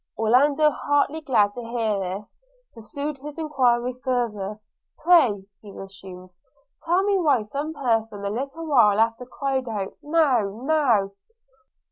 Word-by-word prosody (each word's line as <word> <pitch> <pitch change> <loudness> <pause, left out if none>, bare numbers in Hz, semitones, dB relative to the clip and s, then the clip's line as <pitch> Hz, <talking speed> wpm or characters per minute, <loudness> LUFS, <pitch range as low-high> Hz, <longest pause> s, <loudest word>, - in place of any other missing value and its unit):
Orlando, 280 +7 +3
heartily 290 +2 0
glad 215 -8 +2
to 245 - -7
hear 230 -3 -2
this, 195 +2 -6 0.4
pursued 280 +6 -6
his 295 +2 -9
enquiry 255 -6 +1
farther. 215 -5 -2 0.4
'Pray,' 295 - +3 0.2
resumed 195 -2 -11
he, 180 - -33 0.5
'tell 350 +3 +2
me 400 -1 +2
why 290 -10 +2
some 280 +9 -4
person 225 -8 -1
a 200 - -2
little 275 +8 -5
while 225 -9 +4
after 230 +2 0
cried 265 -2 -2
out 200 -3 -4
Now! 260 -10 +1
now!' 260 -10 +2
245 Hz, 130 wpm, -24 LUFS, 210-290 Hz, 0.5 s, while